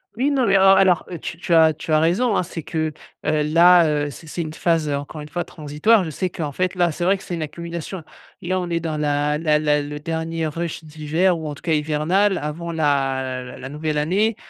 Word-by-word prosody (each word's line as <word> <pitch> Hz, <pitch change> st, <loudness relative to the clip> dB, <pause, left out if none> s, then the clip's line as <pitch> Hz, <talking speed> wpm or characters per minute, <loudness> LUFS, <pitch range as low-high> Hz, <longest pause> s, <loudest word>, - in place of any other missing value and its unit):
Oui, 260 Hz, +5 st, +1 dB
non, 270 Hz, -3 st, +1 dB
mais 195 Hz, -2 st, +4 dB
en 195 Hz, 0 st, +7 dB
alors, 190 Hz, -2 st, +4 dB
heu, 175 Hz, -, -5 dB
tu 160 Hz, -, -7 dB
tu 170 Hz, -1 st, +1 dB
as 160 Hz, -1 st, +6 dB
tu 155 Hz, +1 st, -7 dB
as 155 Hz, -, +5 dB
raison, 195 Hz, +8 st, +2 dB
hein, -, -, +1 dB
c'est 170 Hz, -1 st, -7 dB
que, 155 Hz, 0 st, -3 dB, 0.3 s
heu, 155 Hz, 0 st, +1 dB
là, 170 Hz, +3 st, +6 dB, 0.2 s
heu, -, -, -4 dB
c'est 160 Hz, -, -12 dB
c'est 170 Hz, +3 st, -3 dB
une 155 Hz, -1 st, -7 dB
phase, 165 Hz, -2 st, +1 dB
heu, 145 Hz, -, 0 dB
encore 145 Hz, +2 st, -6 dB
une 150 Hz, -, -9 dB
fois 175 Hz, +3 st, -2 dB
transitoire. 160 Hz, +7 st, +1 dB
Je 160 Hz, -, -5 dB
sais 185 Hz, +5 st, -2 dB
qu'en 155 Hz, -4 st, -4 dB
fait 185 Hz, +5 st, -1 dB
là 175 Hz, -2 st, +2 dB
c'est 175 Hz, -, -4 dB
vrai 190 Hz, +3 st, +3 dB
que 195 Hz, -, -14 dB
c'est -, -, -6 dB
une 170 Hz, -, -3 dB
accumulation, 170 Hz, +3 st, -6 dB, 0.4 s
et 175 Hz, -, -6 dB
là, 185 Hz, 0 st, +1 dB
on 180 Hz, -1 st, -4 dB
est 170 Hz, -1 st, 0 dB
dans 160 Hz, -2 st, -3 dB
la 150 Hz, 0 st, 0 dB
la 155 Hz, -2 st, +2 dB
la 150 Hz, -1 st, +2 dB
le 145 Hz, +1 st, -6 dB
dernier 165 Hz, +1 st, -3 dB
rush 165 Hz, +1 st, -4 dB
d'hiver 160 Hz, +3 st, 0 dB
ou 160 Hz, -, -5 dB
en 145 Hz, -, -5 dB
tout -, -, -16 dB
cas 165 Hz, -2 st, 0 dB
hivernal 155 Hz, +6 st, +1 dB
avant 160 Hz, +3 st, -4 dB
la 135 Hz, -4 st, 0 dB
l -, -, -12 dB
la 135 Hz, -, -7 dB
nouvelle 150 Hz, +1 st, -3 dB
année. 195 Hz, +9 st, +1 dB
160 Hz, 250 wpm, -21 LUFS, 150-175 Hz, 0.4 s, en